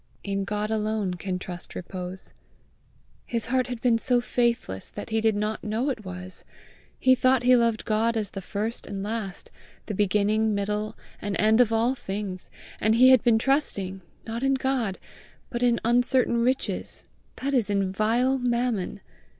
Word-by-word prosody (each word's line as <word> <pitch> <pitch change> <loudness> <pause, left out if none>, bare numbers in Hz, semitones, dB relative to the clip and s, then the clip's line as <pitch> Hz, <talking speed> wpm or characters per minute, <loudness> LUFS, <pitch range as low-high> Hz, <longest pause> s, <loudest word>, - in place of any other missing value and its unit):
In 195 -1 -2
God 210 +1 -2
alone 215 -3 0
can 180 +1 -3
trust 180 -1 -8
repose. 180 +1 -6 0.9
His 230 -2 -2
heart 255 +2 +1
had 245 -3 -5
been 235 -2 +3
so 245 +1 +2
faithless 235 - -1
that - - -8
he 220 0 +1
did 220 -1 +3
not 210 +1 -2
know 230 +6 0
it 225 -5 -6
was! 185 0 -7 0.6
He 260 - +5
thought 255 0 +3
he 250 +1 +6
loved 230 -2 +1
God 225 +1 +1
as 210 -3 -2
the 195 - -6
first 215 +5 -3
and 195 -1 -4
last, 210 -3 -5 0.3
the 215 - -4
beginning, 210 +2 +2
middle, 210 +2 -2 0.2
and 205 -1 -2
end 220 +3 +5
of 235 -2 +3
all 230 +3 +2
things, 195 -6 -5 0.3
and 220 +1 +3
he 255 +2 +7
had 260 -3 +6
been 235 -3 +5
trusting, 205 -8 0 0.2
not 230 +1 -4
in 270 0 +2
God, 260 -7 -1 0.5
but 240 - -3
in 240 -1 +3
uncertain 245 +1 +3
riches, 255 +3 -1 0.3
that 280 +2 -3
is 240 -6 +2
in 195 -2 +1
vile 235 +7 +2
Mammon! 240 -5 -1
220 Hz, 165 wpm, -26 LUFS, 200-245 Hz, 0.9 s, he